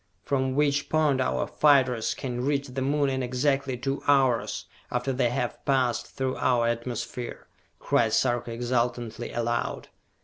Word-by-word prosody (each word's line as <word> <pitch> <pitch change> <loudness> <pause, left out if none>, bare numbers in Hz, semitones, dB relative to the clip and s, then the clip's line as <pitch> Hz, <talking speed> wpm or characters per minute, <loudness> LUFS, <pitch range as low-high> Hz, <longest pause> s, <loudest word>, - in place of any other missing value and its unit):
"From 130 -1 0
which 145 0 +1
point 150 -4 +2
our 130 - 0
fighters 130 -6 +3
can 125 -2 -4
reach 140 0 0
the 130 +1 -4
Moon 140 +2 +1
in 130 -1 -1
exactly 130 +1 0
two 135 +3 -2
hours, 135 -4 +2 0.3
after 125 +2 -1
they 125 -2 +2
have 125 0 -3
passed 130 -4 +1
through 130 -1 -3
our 120 -2 +2
atmosphere!" 120 +1 -4 0.3
cried 115 -2 +1
Sarka 120 +1 +1
exultantly, 120 -1 -2
aloud. 120 0 -2
130 Hz, 140 wpm, -27 LUFS, 120-135 Hz, 0.3 s, fighters